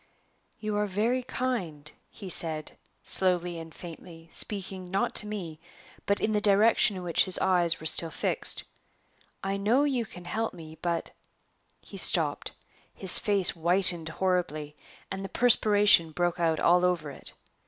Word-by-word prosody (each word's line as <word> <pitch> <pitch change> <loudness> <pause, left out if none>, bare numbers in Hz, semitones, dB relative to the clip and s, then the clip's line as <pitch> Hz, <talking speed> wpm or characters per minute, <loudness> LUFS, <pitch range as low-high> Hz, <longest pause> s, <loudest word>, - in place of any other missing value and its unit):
"You 215 -1 -3
are 210 0 0
very 220 +6 0
kind," 190 - -4 0.2
he 200 - -11
said, 160 -4 -5 0.3
slowly 180 -2 +2
and 165 0 -10
faintly, 165 0 -12
speaking, 190 -3 -2
not 195 +2 -1
to 210 - +1
me, 175 -7 -6 0.5
but 200 - +1
in 215 - -1
the 210 -1 0
direction 205 0 +3
in 180 - -7
which 170 -2 +2
his 185 - +2
eyes 175 -3 +1
were 160 - -11
still 165 +1 +4
fixed. - - 0 0.8
"I 195 +1 -2
know 225 +8 +2
you 260 -5 -1
can 180 -1 -11
help 220 +3 -3
me; 160 -2 -11
but 170 -1 -3 0.4
" - - -44 0.3
He - - -12
stopped; - - +2 0.4
his 190 -2 +3
face 200 -3 +4
whitened 175 0 +2
horribly, 160 -4 -2 0.4
and 195 0 -5
the 195 - -6
perspiration 210 -8 +4
broke 175 +1 -1
out 165 -2 +1
all 175 +1 +3
over 170 -5 0
it. - - -9
180 Hz, 155 wpm, -27 LUFS, 165-205 Hz, 0.8 s, still